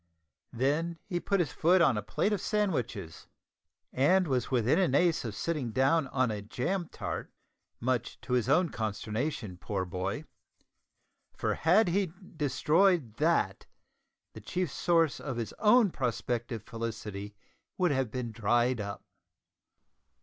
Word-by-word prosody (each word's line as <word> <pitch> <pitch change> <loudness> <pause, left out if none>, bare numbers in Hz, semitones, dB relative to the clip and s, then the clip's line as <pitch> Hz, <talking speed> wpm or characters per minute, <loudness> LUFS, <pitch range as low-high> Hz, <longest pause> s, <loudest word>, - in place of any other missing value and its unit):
Then 150 +7 0
he 175 - -2
put 200 +2 0
his 160 -7 0
foot 180 +4 +4
on 155 -8 +4
a 105 - -1
plate 205 - 0
of 200 - -1
sandwiches, 135 - -2 0.7
and 180 +8 +3
was 130 -4 0
within 125 - +2
an 170 -8 +2
ace 170 0 +3
of 110 -4 -5
sitting 150 -2 -2
down 135 +5 +2
on 130 -2 +1
a 105 -1 -4
jam 155 - -2
tart, - - -5 0.5
much 120 -1 -1
to 125 - -4
his 125 0 +1
own 170 +4 +4
consternation, 110 - -3
poor 95 0 -3
boy, 95 - -3 1.1
for - - 0
had 180 +5 +4
he 190 -1 +1 0.2
destroyed 150 - +2
that, - - +1 0.7
the - - -10
chief 180 -5 -2
source 165 -4 +2
of 135 -4 -5
his 115 -3 -4
own 215 -2 +5
prospective 120 -3 -2
felicity 110 -3 -6 0.4
would 180 -3 +2
have 135 -4 0
been 120 0 -4
dried 120 +2 +1
up. 100 0 -6
130 Hz, 140 wpm, -30 LUFS, 115-170 Hz, 1.1 s, own